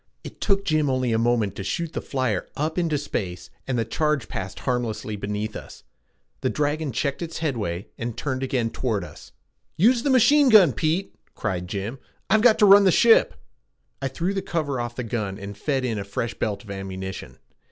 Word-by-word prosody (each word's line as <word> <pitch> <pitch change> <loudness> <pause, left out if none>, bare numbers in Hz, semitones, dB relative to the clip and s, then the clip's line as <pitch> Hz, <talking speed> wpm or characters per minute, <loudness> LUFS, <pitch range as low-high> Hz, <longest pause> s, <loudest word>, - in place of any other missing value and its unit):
It - - -10
took 195 -1 +1
Jim 155 -4 +2
only 130 -2 0
a 110 - +2
moment 115 -4 +1
to 95 - -4
shoot 165 - -3
the - - -3
flyer 130 -8 -1
up 155 +4 -1
into 165 -4 +1
space, 95 -10 -4 0.2
and 130 -2 -1
the 115 - 0
charge 150 -4 0
passed 95 0 -6
harmlessly 115 -4 -2
beneath 105 +2 -4
us. - - -10 0.6
The - - 0
dragon 150 0 -1
checked 140 +4 -2
its 165 -1 -5
headway 105 - -2
and 115 -1 -4
turned 130 -3 -2
again 125 -4 -1
toward 110 -7 -1
us. - - -12 0.5
"Use 235 +7 +4
the 280 - 0
machine 275 +2 +5
gun, 195 - +7
Pete!" 165 +5 -1 0.2
cried 90 -5 -3
Jim. 105 +7 -4 0.3
"I've 215 +1 +5
got 230 -1 +6
to 215 - +5
run 200 0 +8
the 190 - +6
ship." 230 +5 +5 0.7
I 135 - 0
threw 170 +9 -2
the 195 - -1
cover 145 -8 -2
off 120 0 -5
the 125 - -3
gun 105 -4 -3
and 100 0 -7
fed 135 +4 -1
in 115 -4 -1
a - - -3
fresh 100 +4 -3
belt 105 +1 -3
of 100 - -10
ammunition. 95 -8 -6
130 Hz, 195 wpm, -24 LUFS, 105-160 Hz, 0.7 s, run